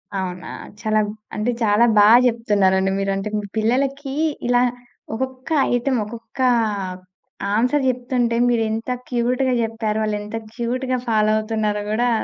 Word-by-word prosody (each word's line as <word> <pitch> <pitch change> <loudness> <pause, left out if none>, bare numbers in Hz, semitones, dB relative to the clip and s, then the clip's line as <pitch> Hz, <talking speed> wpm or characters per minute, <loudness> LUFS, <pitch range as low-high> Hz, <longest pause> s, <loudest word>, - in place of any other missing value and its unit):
అవునా? 180 -2 -4 0.3
చాలా 215 -1 +1 0.4
అంటే 215 +3 0
చాలా 210 +2 +4
బా 205 - +8 0.2
జెప్తున్నారండి 200 -5 +2
మీరు. 195 0 0
అంటే 195 +2 -3
మీ 205 - -5
పిల్లలకి 270 +5 0 0.3
ఇలా 245 0 +4 0.5
ఒక్కొక్క 260 +4 -5 0.2
ఐటమ్ 245 +1 +1
ఒక్కొక్క 230 +2 -11 1.2
ఆన్స‌ర్ 250 +6 +2
జెప్తుంటే 245 -1 0
మీరెంత 225 -1 0 0.2
క్యూట్‌గా 250 +2 +1
జెప్పారో? 225 -1 -2
వాళ్ళు 215 -1 0
ఎంత 210 +2 -7 0.2
క్యూట్‌గా 255 +2 -2
ఫాలో 215 -2 +3
అవుతున్నారో 215 -1 -1
గూడా 240 +3 +1
230 Hz, 125 wpm, -21 LUFS, 215-250 Hz, 1.2 s, బా